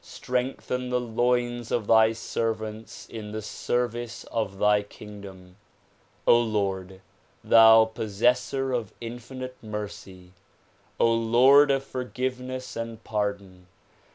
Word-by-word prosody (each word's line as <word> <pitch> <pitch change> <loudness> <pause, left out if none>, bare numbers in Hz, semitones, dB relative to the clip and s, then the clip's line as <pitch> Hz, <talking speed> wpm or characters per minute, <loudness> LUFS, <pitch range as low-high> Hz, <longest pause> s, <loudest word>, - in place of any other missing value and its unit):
Strengthen 125 0 -3
the 125 0 +1
loins 120 0 -1
of 115 -3 -1
thy 110 0 +5
servants 110 -1 -4
in 105 -2 -8
the 110 - -4
service 120 +1 -3
of 110 -4 -2
thy 105 +1 +3
kingdom. 100 -3 -12 0.7
Lord, 100 -5 +1 0.4
thou 110 0 +7
possessor 120 +5 0
of 115 -5 -3
infinite 125 +2 -8
mercy! 100 -4 -8 0.6
Lord 120 +5 +5
of 135 -1 +1
forgiveness 130 0 -5
and 115 -1 -6
pardon! 100 -4 -4
115 Hz, 100 wpm, -26 LUFS, 105-125 Hz, 0.7 s, thou